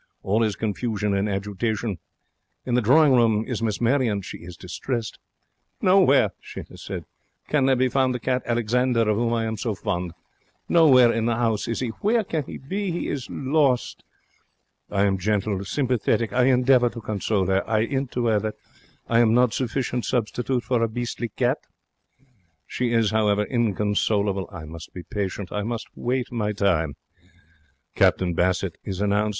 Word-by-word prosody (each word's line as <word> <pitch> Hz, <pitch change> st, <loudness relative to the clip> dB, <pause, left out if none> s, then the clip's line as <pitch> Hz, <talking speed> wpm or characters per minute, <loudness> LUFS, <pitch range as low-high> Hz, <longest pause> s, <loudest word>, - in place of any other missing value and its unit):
All 105 Hz, +4 st, +1 dB
is 110 Hz, -3 st, +1 dB
confusion 105 Hz, -1 st, -2 dB
and 100 Hz, +2 st, 0 dB
agitation. 105 Hz, 0 st, -2 dB, 0.7 s
In 125 Hz, -, -2 dB
the 125 Hz, -, +3 dB
drawing 140 Hz, +5 st, +5 dB
room 115 Hz, -3 st, +3 dB
is 125 Hz, -4 st, -3 dB
Miss 110 Hz, -3 st, -1 dB
Marion. 120 Hz, -5 st, +1 dB
She -, -, -8 dB
is 85 Hz, 0 st, -11 dB
distressed. 110 Hz, +5 st, -4 dB, 0.6 s
'Nowhere,' 185 Hz, -7 st, +4 dB
she -, -, -8 dB
has -, -, -12 dB
said, -, -, -6 dB, 0.4 s
'can 140 Hz, -3 st, +2 dB
there 135 Hz, -, +4 dB
be 130 Hz, +1 st, +2 dB
found 130 Hz, 0 st, +1 dB
the -, -, -3 dB
cat 125 Hz, +1 st, 0 dB
Alexander 120 Hz, +1 st, +1 dB
of 105 Hz, -, +2 dB
whom 115 Hz, +2 st, 0 dB
I 115 Hz, -1 st, 0 dB
am 110 Hz, 0 st, -3 dB
so 110 Hz, -3 st, -2 dB
fond. 90 Hz, -3 st, -3 dB, 0.5 s
Nowhere 130 Hz, -8 st, +6 dB
in 115 Hz, 0 st, 0 dB
the 120 Hz, -, +2 dB
'ouse 115 Hz, -3 st, 0 dB
is 115 Hz, -, -2 dB
he, 125 Hz, -, -1 dB
Where 220 Hz, +2 st, +2 dB
can 160 Hz, -6 st, -3 dB
he -, -, -7 dB
be? 190 Hz, +8 st, -3 dB
He 175 Hz, 0 st, -3 dB
is 135 Hz, -4 st, -4 dB
lost.' 135 Hz, -2 st, 0 dB, 0.9 s
I 100 Hz, -1 st, +1 dB
am 95 Hz, -1 st, +1 dB
gentle, 100 Hz, 0 st, 0 dB
sympathetic. 120 Hz, -2 st, 0 dB
I 125 Hz, 0 st, +3 dB
endeavour 125 Hz, -1 st, +4 dB
to 115 Hz, -, -8 dB
console 105 Hz, -2 st, -1 dB
her. 95 Hz, +1 st, +1 dB
I 110 Hz, -1 st, +2 dB
'int 135 Hz, +3 st, -1 dB
to 120 Hz, -1 st, -1 dB
her 110 Hz, -2 st, +3 dB
that 110 Hz, 0 st, -4 dB, 0.5 s
am 115 Hz, -1 st, +4 dB
I -, -, +3 dB
not 125 Hz, -1 st, +3 dB
sufficient 125 Hz, 0 st, -2 dB
substitute 125 Hz, +2 st, -1 dB
for 125 Hz, -2 st, 0 dB
a 115 Hz, -, +3 dB
beastly 120 Hz, 0 st, -4 dB
cat? -, -, 0 dB, 1.1 s
She 125 Hz, -2 st, -2 dB
is, 115 Hz, -3 st, +2 dB
however, 105 Hz, -1 st, +2 dB
inconsolable. 105 Hz, -3 st, 0 dB
I 90 Hz, -5 st, -8 dB
must 80 Hz, +1 st, -10 dB
be 90 Hz, -, -7 dB
patient. 100 Hz, -1 st, -4 dB
I 105 Hz, -, -2 dB
must 115 Hz, +2 st, -4 dB
wait 125 Hz, +1 st, -2 dB
my 105 Hz, -3 st, -1 dB
time. 85 Hz, -8 st, +1 dB, 1.0 s
Captain 90 Hz, -2 st, +2 dB
Bassett 90 Hz, +1 st, 0 dB
is 95 Hz, -2 st, -5 dB
announced. 105 Hz, +1 st, +1 dB
115 Hz, 175 wpm, -24 LUFS, 105-125 Hz, 1.1 s, Nowhere